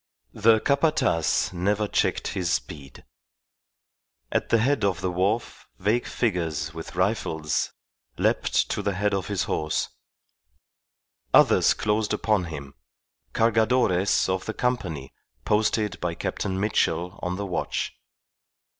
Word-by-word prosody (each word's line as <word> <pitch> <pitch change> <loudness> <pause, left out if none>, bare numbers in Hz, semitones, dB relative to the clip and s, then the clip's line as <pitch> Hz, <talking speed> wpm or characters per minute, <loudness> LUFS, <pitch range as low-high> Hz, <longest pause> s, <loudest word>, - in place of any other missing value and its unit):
The 110 +1 +4
Capataz 140 - +1
never 100 +4 0
checked - - 0
his 90 -3 -2
speed. 70 -9 -5 1.3
At - - 0
the 115 - +4
head 130 +1 +1
of 100 -3 +1
the 90 - -1
wharf 100 +6 -1
vague 115 +4 0
figures 80 -8 -1
with 80 +1 -8
rifles 90 -5 0 0.5
leapt - - +1
to - - -1
the 100 -2 -1
head 100 +2 0
of 95 -3 -1
his 100 -3 -1
horse; 75 0 -1 1.5
others - - +5
closed 105 0 0
upon 105 -3 +1
him 70 -4 -7 0.6
cargadores 110 -4 +3
of 95 0 -1
the 110 - -3
company 90 - -2 0.3
posted 105 -2 +1
by 85 -1 -2
Captain 95 +2 -3
Mitchell 90 -3 0
on 90 0 -2
the 100 +2 -4
watch. 90 - -2
100 Hz, 120 wpm, -25 LUFS, 85-110 Hz, 1.5 s, others